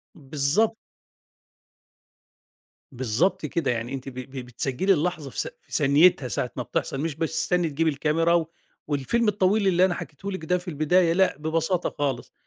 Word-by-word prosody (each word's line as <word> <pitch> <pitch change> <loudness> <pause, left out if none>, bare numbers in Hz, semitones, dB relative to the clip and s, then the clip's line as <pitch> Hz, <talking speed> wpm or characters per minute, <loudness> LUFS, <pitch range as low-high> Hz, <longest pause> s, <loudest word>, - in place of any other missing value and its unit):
بالضبط. 150 +10 0 2.1
بالضبط 130 - 0
كده، 150 -2 -1
يعني 120 +2 -3
أنتِ 135 0 -5
ب - - -12
ب 130 +2 -8
بتسجلّي 135 - 0
اللحظة 160 -3 -2
في - - -7
ث - - -1
في - - -30
ثانيتها 145 0 +4
ساعة 105 - -2
ما - - -3
بتحصل 135 - -3
مش 160 -2 -2
بتستني 160 +1 0
تجيبي 160 +3 +1
الكاميرا، 160 +3 +2 0.4
والفيلم 155 - 0
الطويل 200 0 +2
اللي 185 0 +4
أنا 185 - 0
حكيته 180 +3 -7
لِك 175 -4 -5
ده 180 +3 +2
في 180 +1 -11
البداية 165 +2 +2
لأ، 190 -4 +2
ببساطة 160 +3 0
خالص. 135 -4 -2
160 Hz, 155 wpm, -25 LUFS, 140-180 Hz, 2.1 s, ثانيتها